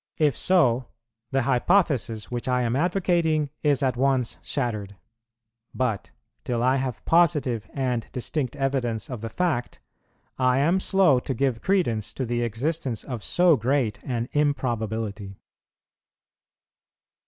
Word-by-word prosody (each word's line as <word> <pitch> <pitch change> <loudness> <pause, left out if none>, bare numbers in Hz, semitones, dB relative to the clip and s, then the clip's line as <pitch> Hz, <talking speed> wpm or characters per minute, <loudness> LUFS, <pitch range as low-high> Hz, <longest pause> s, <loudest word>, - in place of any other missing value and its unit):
If 150 -5 +2
so, 130 -9 +2 0.4
the 135 -1 +1
hypothesis 130 - +1
which 120 +1 -4
I 125 -1 +1
am 120 +1 0
advocating 165 -2 +1
is 145 -2 +2
at 130 -2 +1
once 130 -2 +1
shattered; 105 -4 -3 0.8
but, 125 -6 -1 0.3
till 120 -1 -1
I 130 +2 +3
have 130 -3 -4
positive 150 -10 +2
and 125 -4 -2
distinct 130 +1 -3
evidence 130 -5 -2
of 120 -4 -5
the 115 - -4
fact, 155 -8 -2 0.6
I 130 0 +3
am 165 +7 +3
slow 185 -9 +4
to 130 +1 -4
give 125 -2 0
credence 120 - 0
to 130 - -3
the 120 0 -1
existence 125 +2 -2
of 120 -6 -6
so 175 -2 +4
great 125 -2 0
an 120 -2 -2
improbability. 110 -8 -2
130 Hz, 130 wpm, -25 LUFS, 115-145 Hz, 0.8 s, slow